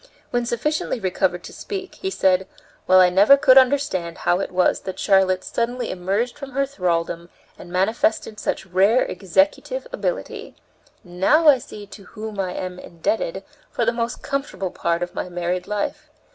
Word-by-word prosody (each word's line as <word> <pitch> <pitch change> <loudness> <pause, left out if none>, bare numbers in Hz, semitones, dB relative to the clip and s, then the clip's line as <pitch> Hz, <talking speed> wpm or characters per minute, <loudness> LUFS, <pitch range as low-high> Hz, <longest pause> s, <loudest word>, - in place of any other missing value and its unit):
When 240 -1 0
sufficiently 260 +2 -1
recovered 185 -2 -1
to - - -10
speak, 390 -2 -6
he 385 - -4
said: 190 - +2 0.4
"Well, 185 0 +7
I 180 -1 +6
never 205 +9 +6
could 260 -2 +5
understand 260 - +3
how 175 - +1
it 195 - -3
was 180 0 +2
that 190 -1 -7
Charlotte 190 -2 +2
suddenly 245 +1 -2
emerged 195 +9 -2
from 275 -2 -8
her 275 +1 +1
thraldom 170 -8 -2 0.3
and 175 - -12
manifested 210 +3 0
such 190 - -3
rare 195 +7 +3
executive 295 - 0
ability. - - -4 0.5
Now 190 - +2
I 270 -3 +6
see 210 -3 -10
to 200 0 -13
whom 215 -2 -8
I 185 -2 -2
am 180 -1 -5
indebted 325 - -3 0.3
for - - -1
the - - +2
most 235 +1 -3
comfortable 275 -9 -3
part 170 +1 -1
of 175 - -6
my - - -4
married 175 +1 -3
life. 210 -1 -3
200 Hz, 165 wpm, -22 LUFS, 180-260 Hz, 0.5 s, Well